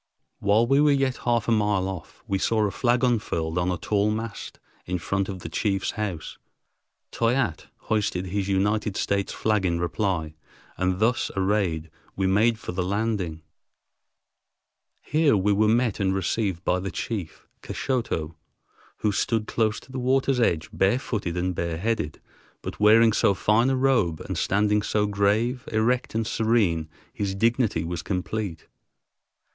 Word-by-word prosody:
While 105 +3 +3
we 135 +4 +3
were 150 - +5
yet 135 -2 +1
half 120 -3 +2
a - - +2
mile 105 -4 +2
off, 95 -5 -8
we 95 -1 0
saw 110 +1 +2
a 100 - -1
flag 120 +2 +1
unfurled 90 -9 0
on 90 +1 0
a 90 - -1
tall 105 +5 +1
mast 110 0 -5 0.3
in 90 0 -1
front 95 +3 -2
of 95 -2 -6
the - - -6
chief's 95 +3 -1
house. 95 -7 -5 0.7
Toyatte 115 - 0
hoisted 100 -4 -1
his 95 +1 -2
United 105 +1 0
States 100 -1 0
flag 105 -3 0
in 85 -2 0
reply, 85 -3 -1 0.4
and 95 0 0
thus 115 +4 +1
arrayed 95 -5 0 0.2
we 95 - 0
made 110 +5 +3
for - - -6
the 90 +1 -2
landing. 95 -4 -2 1.6
Here 150 -7 +3
we 100 +2 +2
were 105 +2 +3
met 115 -1 +2
and 95 -1 +1
received 95 -2 -1
by 90 - +2
the 95 +1 -4
chief, 95 0 -5 0.2
Kashoto, 115 - -2 0.7
who 105 - +2
stood 110 +2 0
close 110 -1 0
to 130 - -16
the 130 - -4
water's 130 +1 +2
edge, 85 -9 +1
barefooted 100 -3 0
and 90 +1 0
bareheaded, 85 -1 -2 0.4
but - - -6
wearing 110 +1 +6
so 100 - +3
fine 110 +6 +3
a 135 - +2
robe 125 -12 +2
and - - -5
standing 105 +1 +2
so 105 0 0
grave, 105 +5 +1
erect, 115 +2 +1
and 115 0 0
serene, 105 -9 +1 0.2
his 100 -2 -2
dignity 115 +2 +1
was 85 0 -4
complete. 90 -1 -3
105 Hz, 155 wpm, -25 LUFS, 90-115 Hz, 1.6 s, wearing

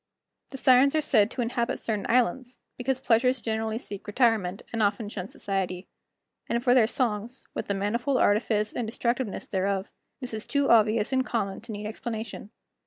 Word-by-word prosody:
The 270 - -7
Sirens 260 +2 +5
are 310 - +3
said 220 -7 +3
to 245 - -2
inhabit 235 0 -1
certain 215 -3 -3
islands, 250 +1 +1 0.2
because 260 +1 -1
pleasures 250 +1 +3
generally 220 -1 -2
seek 205 -5 -8
retirement, 210 -4 +1
and 230 - 0
often 205 +1 +1
shun 190 -3 -5
society. 190 -2 -3 0.6
And 235 0 0
for 245 -1 +4
their 240 -4 +5
songs, 235 -1 -2
with - - -4
the 200 - 0
manifold 235 +7 0
artifice 210 -1 +2
and 235 - -2
destructiveness 235 -1 -2
thereof, 195 +1 -1 0.3
this 250 -4 -6
is 215 -1 -5
too 280 -1 +2
obvious 220 +1 +4
and 260 0 +3
common 200 -6 -2
to 230 +1 -9
need 210 0 -6
explanation. 220 -1 -5
225 Hz, 175 wpm, -27 LUFS, 205-250 Hz, 0.6 s, Sirens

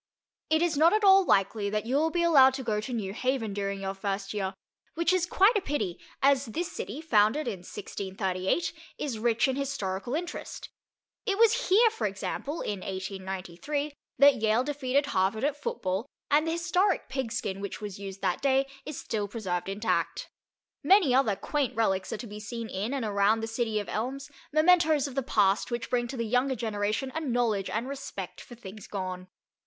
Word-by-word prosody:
It 315 +1 +3
is 340 -4 +1
not 325 +5 +6
at 430 0 +2
all 390 -1 +7
likely 200 - +2
that 210 +1 -2
you 250 +3 -1
will 315 +3 +3
be 340 +1 0
allowed 270 -6 +6
to 265 - -5
go 215 -3 0
to 235 - -6
New 205 -5 -3
Haven 250 -3 -1
during 200 -1 -3
your 195 0 -2
first 195 0 -3
year, 195 -2 -2 0.4
which 335 +2 +2
is 360 -1 +1
quite 400 +6 +4
a 415 - +2
pity, 215 - -2 0.2
as 275 0 +4
this 330 +10 -3
city, 255 +10 -5
founded 230 -1 +3
in 205 -6 -3
1638, 190 - -2 0.2
is 250 -7 -3
rich 230 +1 +2
in 265 - 0
historical 245 -5 -2
interest. 345 +2 -5 0.6
It 395 -1 +1
was 460 +1 +3
here, 445 +4 +6
for 220 - -1
example, 240 - -4
in 205 -2 -3
1893, 190 - -4 0.2
that 280 -4 +6
Yale 220 +2 +3
defeated 280 0 0
Harvard 200 -3 0
at 290 0 +1
football, 265 - -3 0.2
and 305 +3 +4
the 325 - 0
historic 360 +3 +1
Pigskin 230 -7 -3
which 200 - -5
was 205 -2 -7
used 195 -1 -7
that 180 - 0
day 270 0 +3 0.2
is 300 - -5
still 210 -3 -2
preserved 190 -5 -3
intact. 205 +3 -1 0.5
Many 375 -9 +5
other 250 -6 +3
quaint 285 +3 -2
relics 195 -4 0
are - - -2
to 240 - -7
be 210 -1 -8
seen 225 +1 -6
in 205 +6 -3
and 260 -5 -2
around 205 +2 +2
the - - -1
city 225 -1 -1
of 205 - -5
elms, 270 +6 -4 0.2
mementos 310 -2 +4
of 275 - -8
the 270 - 0
past 205 -4 +2
which 240 -1 -4
bring 240 -1 +1
to 260 - -6
the 230 - -1
younger 250 +4 +1
generation 215 +3 -2
a 320 - -2
knowledge 235 -8 0
and 230 +4 -2
respect 235 -9 -6
for 240 - -12
things 215 -2 -10
gone. 185 -2 -5
235 Hz, 190 wpm, -28 LUFS, 200-290 Hz, 0.6 s, all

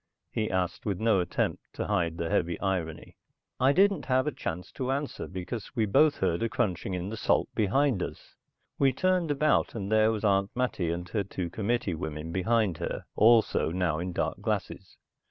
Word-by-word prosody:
he 110 -1 -1
asked 95 -1 -1
with 100 -4 -2
no 110 -3 +3
attempt 90 -1 -1
to - - -3
hide 85 -6 0
the 85 - -2
heavy 85 +1 0
irony. 90 -5 -3 0.4
I 130 +2 +5
didn't 195 +5 +3
have 130 -1 +2
a 150 - 0
chance 90 - -5
to 130 0 -3
answer 140 +1 -3
because 95 +6 -6
we 115 -3 +2
both 145 +8 +4
heard 85 - 0
a 115 - 0
crunching 95 -5 -1
in 90 +2 -4
the 110 - -5
salt - - +1
behind 115 +1 +2
us. - - -6 0.5
We 135 -2 +4
turned 185 +2 +1
about 145 -1 +2
and 100 -2 -4
there 110 0 +4
was 110 -1 -3
Aunt 100 -1 +2
Mattie 120 -9 0
and 85 +1 -3
her 105 -3 0
two 90 -3 -5
committee 110 -1 -1
women 80 -1 -5
behind 95 0 +1
her - - -4
also 110 -5 +4
now 85 -2 0
in 90 +2 -3
dark - - -2
glasses. - - -3
100 Hz, 190 wpm, -28 LUFS, 90-125 Hz, 0.5 s, I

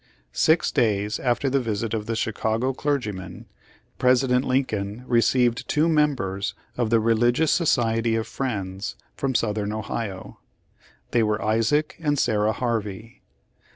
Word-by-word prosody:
Six 160 +2 +3
days 105 -5 +1
after 125 +2 0
the 135 +1 +2
visit 115 -2 -2
of 110 -1 -3
the 115 - -1
Chicago 110 +3 -1
clergy 140 -5 -1
men, 95 -2 -9 0.5
President 125 0 +3
Lincoln 115 -4 -1
received 120 0 +2
two 155 +2 +2
members 135 - 0 0.2
of 120 -3 0
the 115 0 +4
Religious 120 +7 +2
Society 115 -8 +2
of 110 -1 -1
Friends 100 -7 -4 0.2
from 135 -2 -2
Southern 105 -2 0
Ohio. 110 -2 -5 0.7
They 120 - +3
were 105 0 +1
Isaac 115 +9 +1
and 145 -3 0
Sarah 105 -3 +2
Harvey. 110 -2 -4
115 Hz, 130 wpm, -24 LUFS, 105-130 Hz, 0.7 s, the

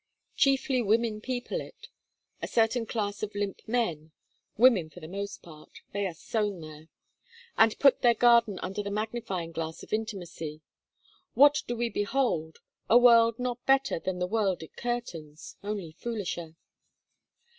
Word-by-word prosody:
Chiefly 270 -2 +2
women 220 0 +1
people 255 - -3
it: 465 - -12 0.5
a - - -3
certain 225 +1 +1
class 205 -3 -3
of 215 -1 -4
limp 205 -1 -3
men; 175 -10 -1 0.5
women 220 -9 +5
for 180 - -13
the 155 - -9
most 200 +3 -6
part: 155 -3 -14 0.2
they 200 0 -1
are 175 - -7
sown 205 +1 -2
there. 155 0 -11 0.7
And 225 -1 +4
put 275 -2 +5
their 240 -1 +5
garden 235 -4 +4
under 195 +2 -3
the 200 - -5
magnifying 205 -5 -3
glass 160 0 -5
of - - -9
intimacy, 175 -8 -4 0.7
what 290 +2 +6
do 240 - -2
we 240 0 0
behold? 205 - -1 0.3
A 235 - +7
world 230 -2 +6
not 245 -1 -3
better 270 -8 +3
than 185 +2 -3
the 180 - -1
world 195 -3 0
it 160 - -13
curtains, 170 -11 -5
only 200 -5 -4
foolisher. 175 -5 -5
210 Hz, 150 wpm, -28 LUFS, 175-235 Hz, 0.7 s, A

